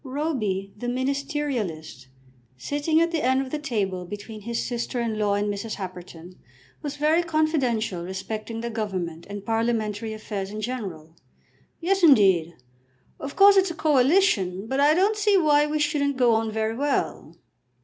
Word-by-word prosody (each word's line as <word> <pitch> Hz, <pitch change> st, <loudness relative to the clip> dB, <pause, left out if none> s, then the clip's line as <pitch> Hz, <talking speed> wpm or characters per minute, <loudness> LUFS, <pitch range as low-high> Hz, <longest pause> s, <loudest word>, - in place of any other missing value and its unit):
Roby 255 Hz, -9 st, -2 dB
the 240 Hz, +4 st, -6 dB
ministerialist, 255 Hz, -, -3 dB, 0.5 s
sitting 290 Hz, -, 0 dB
at 335 Hz, 0 st, +2 dB
the 325 Hz, -3 st, -1 dB
end 260 Hz, +1 st, +3 dB
of 265 Hz, -1 st, -4 dB
the 305 Hz, -, -2 dB
table 200 Hz, -10 st, -2 dB
between 205 Hz, +4 st, -8 dB
his 235 Hz, +2 st, -3 dB
sister 240 Hz, 0 st, -3 dB
in 225 Hz, -2 st, -2 dB
law 205 Hz, -1 st, +2 dB
and 205 Hz, +1 st, 0 dB
Mrs. 205 Hz, +2 st, -3 dB
Happerton, 180 Hz, -2 st, -9 dB, 0.4 s
was 290 Hz, -1 st, -4 dB
very 305 Hz, +3 st, +3 dB
confidential 275 Hz, -, 0 dB
respecting 215 Hz, +5 st, -5 dB
the 235 Hz, 0 st, -4 dB
Government 185 Hz, -7 st, -4 dB
and 200 Hz, -1 st, -7 dB
parliamentary 225 Hz, -1 st, -1 dB
affairs 210 Hz, -3 st, -5 dB
in 215 Hz, +1 st, -6 dB
general. 195 Hz, -10 st, -5 dB, 0.6 s
"Yes, 385 Hz, +3 st, +1 dB
indeed; 190 Hz, -, +5 dB, 0.6 s
of 275 Hz, -, -6 dB
course 395 Hz, 0 st, +7 dB
it's 385 Hz, -1 st, +4 dB
a 335 Hz, -, -5 dB
coalition, 265 Hz, -, +2 dB
but 265 Hz, +4 st, -2 dB
I 295 Hz, +2 st, +5 dB
don't 400 Hz, +5 st, +3 dB
see 415 Hz, -1 st, +3 dB
why 300 Hz, -3 st, +4 dB
we 305 Hz, +1 st, -1 dB
shouldn't 295 Hz, -2 st, 0 dB
go 245 Hz, -3 st, +4 dB
on 225 Hz, 0 st, +1 dB
very 220 Hz, +1 st, -1 dB
well. 285 Hz, +3 st, -2 dB
235 Hz, 160 wpm, -25 LUFS, 200-295 Hz, 0.6 s, course